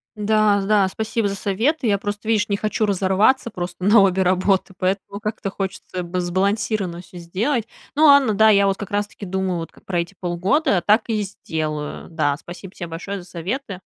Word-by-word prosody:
Да-да, 210 -1 +3
спасибо 220 +1 -1
за 200 - -3
советы. 230 +9 0
Я 200 -1 +3
просто, 205 +2 -5
видишь, 215 -1 +1
не 200 - +1
хочу 215 +1 0
разорваться 200 +6 +2
просто 180 -1 -6
на 210 +2 +6
обе 190 -1 +3
работы 190 +1 +1
поэтому 195 +2 -2
как-то 215 -2 -3
хочется 190 -2 -5
б 175 +1 -3
сбалансированно 190 0 -1
всё 180 0 -14
сделать, 215 +8 -1 0.3
но 310 +1 +5
ладно, 280 -6 +6
да, 220 +2 +5
я 200 -1 +5
вот 195 - 0
как 205 - -7
раз 205 0 0
таки 205 - -10
думаю 190 -2 -1
вот 165 - -6
ка - - -20
про 175 -2 -2
эти 170 +3 -4
полгода, 185 - +1
так 215 +2 +4
и 215 -2 0
сделаю, 155 -6 -4
да, 145 -3 0
спасибо 180 +4 -10
тебе 175 - -6
большое 190 +4 -5
за 175 - -15
советы. 195 - -4
195 Hz, 190 wpm, -21 LUFS, 180-215 Hz, 0.3 s, на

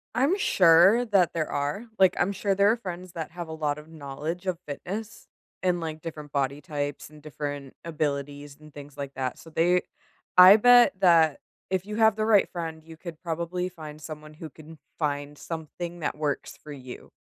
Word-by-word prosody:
I’m 280 - +2
sure 185 - +5
that 195 -6 +2
there 160 -2 -2
are. 145 +11 -2
Like, 190 -1 +5
I’m 195 - +1
sure 200 0 -1
there 200 +2 +4
are 235 - 0
friends 180 -4 -7
that 160 -3 -5
have 170 -2 -7
a - - -6
lot 145 0 0
of 150 +1 -12
knowledge 155 +4 -6
of 180 -2 -1
fitness, 205 +9 -7 0.3
and, 180 -2 +1
like, 160 -1 -5
different 150 -3 -8
body 140 +1 -1
types 145 -3 -4
and 150 -1 -16
different 145 -2 -6
abilities, 145 -2 -3
and 155 -1 -16
things 145 -1 -11
like 140 -1 -6
that. 130 -1 -3
So, 165 - -13
they 175 +3 +2 0.6
I 185 +2 +11
bet 245 0 +6
that 165 -5 +4 0.3
if 190 0 -1
you 210 +1 -5
have 220 -1 +5
the 215 0 -1
right 200 - +5
friend, 165 -2 -5
you 160 0 -12
could 165 -1 -10
probably 170 +1 -3
find 155 -4 -10
someone 155 0 -9
who 160 0 -8
can 160 +2 -14 0.2
find 145 -1 -2
something 170 +2 -6
that 150 - -3
works 150 -2 -3
for 150 - -10
you. 130 -3 -10
160 Hz, 190 wpm, -26 LUFS, 145-180 Hz, 0.6 s, I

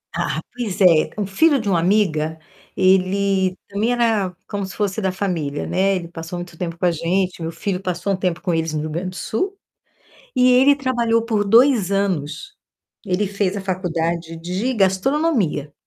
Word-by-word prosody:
Ah, - - -1
pois 230 -7 -4
é, 170 -5 +5
o 205 - -1
filho 280 - +3
de 215 - -5
uma 175 -4 +2
amiga, 160 -5 +1 0.4
ele 190 0 +2
também 215 +5 0
era 220 -6 +1 0.2
como 205 -1 -3
se 190 - -7
fosse 205 0 -1
da 190 - 0
família, 170 -7 -2
né, 195 +1 +1
ele 170 -2 -4
passou 170 +1 -7
muito 175 -1 -8
tempo 170 0 -5
com 180 - -1
a 175 - +4
gente, 175 +2 -1
meu 165 0 -3
filho 190 +1 -3
passou 180 +1 -2
um - - +1
tempo 180 -2 -1
com 175 - -2
eles 160 -1 -1
no 150 - -1
Rio 155 - -4
Grande 180 +4 -3
do 185 - -11
Sul 375 - -3 0.8
e 255 0 +5
ele 270 +3 +5
trabalhou 235 -4 +1
por 220 -3 0
2 230 -2 +4
anos. 195 - -2 0.5
Ele 200 +1 0
fez 200 0 -1
a - - -2
faculdade 170 -3 -2
de 185 +9 -2
gastronomia 195 - +1
190 Hz, 180 wpm, -21 LUFS, 170-215 Hz, 0.8 s, é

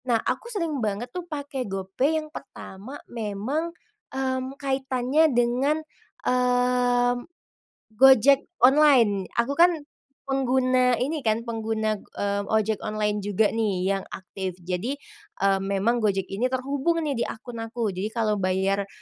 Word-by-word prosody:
Nah, 240 -3 +3
aku 460 - -3
sering 335 - -2
banget 220 +3 -3
tuh 355 -1 -6
pakai 285 -6 -4
GoPay 195 +11 0
yang 310 -1 -4
pertama 210 +10 -9
memang, 230 +9 -3 0.4
mmm, 260 0 -3
kaitannya 270 +2 +1
dengan, 250 +4 +2 0.5
mmm, 245 -1 +2 0.7
Gojek 265 +3 +6 0.2
online. 255 -8 +5
Aku 235 +3 +1
kan 345 0 +6 0.5
pengguna 255 -2 +2
ini 295 +6 -1
kan, 225 -3 0
pengguna, 220 -2 -2
mmm, 200 0 -3
ojek 220 -1 +1
online 210 -1 -1
juga 205 +1 +1
nih, 210 -5 0
yang 195 -1 -2
aktif. 185 -1 -6
Jadi, 185 +10 -2 0.5
mmm, 195 0 +3
memang 200 +5 +1
Gojek 200 -3 +1
ini 215 +6 0
terhubung 275 +6 -1
nih, 280 -5 -2
di - - +1
akun 235 +1 -8
aku, 225 -1 -2
jadi 190 +3 -3
kalau 215 -3 +1
bayar, 190 +1 0
245 Hz, 135 wpm, -25 LUFS, 210-265 Hz, 0.7 s, Gojek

